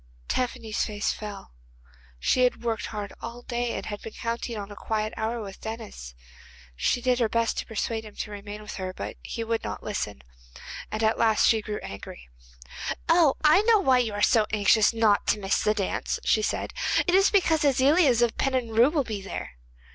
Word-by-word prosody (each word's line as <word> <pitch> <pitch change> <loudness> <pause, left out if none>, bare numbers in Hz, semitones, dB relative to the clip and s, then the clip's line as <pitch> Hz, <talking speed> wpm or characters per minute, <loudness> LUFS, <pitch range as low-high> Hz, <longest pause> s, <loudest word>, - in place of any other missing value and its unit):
Tephany's 240 -3 -1
face 210 -1 -1
fell; 205 - -8 0.7
she 70 - +2
had 250 -1 +1
worked 225 -3 -2
hard 205 -2 -6
all 235 +1 -7
day, 240 -1 -2
and 195 - -5
had 205 -1 -6
been 225 - -8
counting 235 0 -4
on 205 0 -6
a - - -8
quiet 215 +1 -2
hour 225 +2 -2
with 195 -1 -10
Denis. 215 - -7 0.6
She 65 - 0
did 250 0 +2
her 230 -3 +2
best 230 0 0
to - - -5
persuade 225 0 -2
him 215 -1 -12
to 210 - -5
remain 205 +1 -8
with 210 - -7
her, 185 -1 -4
but - - -6
he 230 - -5
would 225 0 -2
not - - -5
listen, 65 - -4 0.7
and 215 +1 -2
at 220 +1 +2
last 220 -1 +4
she 220 -1 +3
grew 210 0 -4
angry. 80 -10 -9 0.8
'Oh, 330 -4 +5
I 310 +5 +6
know 445 +1 +5
why 260 -9 +4
you 230 -4 0
are 205 - -1
so 220 -3 +4
anxious 210 0 +4
not 225 -3 +2
to - - +2
miss 195 -1 0
the 215 - +2
dance,' 195 -3 -2
she 215 - +3
said; - - -2 0.3
'it 355 - +1
is 390 +1 +6
because 325 -6 +3
Aziliez 275 -2 +4
of 235 -1 +1
Pennenru 250 -1 +2
will 305 -4 +1
be 215 -5 -5
there. 195 - -6
225 Hz, 195 wpm, -26 LUFS, 210-245 Hz, 0.8 s, I